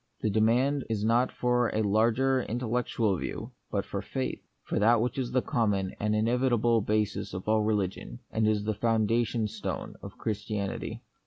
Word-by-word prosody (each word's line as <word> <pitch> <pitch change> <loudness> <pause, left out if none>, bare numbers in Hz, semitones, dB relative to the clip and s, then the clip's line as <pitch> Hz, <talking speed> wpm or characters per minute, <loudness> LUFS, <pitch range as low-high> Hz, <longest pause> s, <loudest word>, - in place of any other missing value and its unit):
The 110 - +1
demand 125 +6 +2
is 110 -2 -1
not 120 +3 +3
for 125 -1 +1
a 110 - +2
larger 115 +6 +3
intellectual 115 -3 0
view, - - -5 0.2
but - - -1
for - - -4
faith; 65 - -3 0.2
for - - -1
that 115 +3 +5
which 125 +4 -1
is 125 -2 -1
the 130 -1 +1
common 100 -5 0
and 105 0 +1
inevitable 120 0 +2
basis 105 -2 -1
of 95 - -6
all 110 0 +3
religion, 100 - -1
and 110 -1 +1
is 105 -1 +1
the 110 +1 0
foundation 115 +1 +1
stone 105 0 -5
of - - -9
Christianity. 105 -2 -3
110 Hz, 165 wpm, -29 LUFS, 105-120 Hz, 0.2 s, that